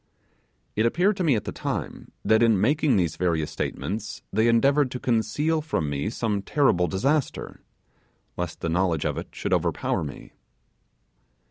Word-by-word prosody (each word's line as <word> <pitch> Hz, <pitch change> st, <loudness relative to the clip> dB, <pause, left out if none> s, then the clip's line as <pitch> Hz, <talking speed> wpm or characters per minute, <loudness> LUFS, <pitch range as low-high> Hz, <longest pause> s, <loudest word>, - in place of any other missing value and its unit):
It 110 Hz, +2 st, +3 dB
appeared 185 Hz, -, +2 dB
to 185 Hz, -, 0 dB
me, 150 Hz, -7 st, +3 dB
at 105 Hz, -, -1 dB
the -, -, -4 dB
time, -, -, -5 dB
that 110 Hz, +1 st, +4 dB
in 115 Hz, -4 st, +4 dB
making 145 Hz, +4 st, +3 dB
these 90 Hz, -5 st, 0 dB
various 80 Hz, -4 st, 0 dB
statements 105 Hz, +9 st, -4 dB
they 110 Hz, +3 st, +3 dB
endeavoured 135 Hz, +4 st, +4 dB
to 125 Hz, -, -5 dB
conceal 125 Hz, +8 st, +1 dB
from 80 Hz, -, -2 dB
me 70 Hz, +8 st, -1 dB
some 110 Hz, -3 st, -1 dB
terrible 95 Hz, -7 st, +2 dB
disaster, 135 Hz, -, -1 dB, 0.7 s
lest 90 Hz, -2 st, -5 dB
the 85 Hz, -, -1 dB
knowledge 85 Hz, -2 st, +1 dB
of -, -, -1 dB
it -, -, -7 dB
should -, -, -3 dB
overpower -, -, 0 dB
me. 70 Hz, -3 st, -9 dB
110 Hz, 155 wpm, -25 LUFS, 90-140 Hz, 0.7 s, that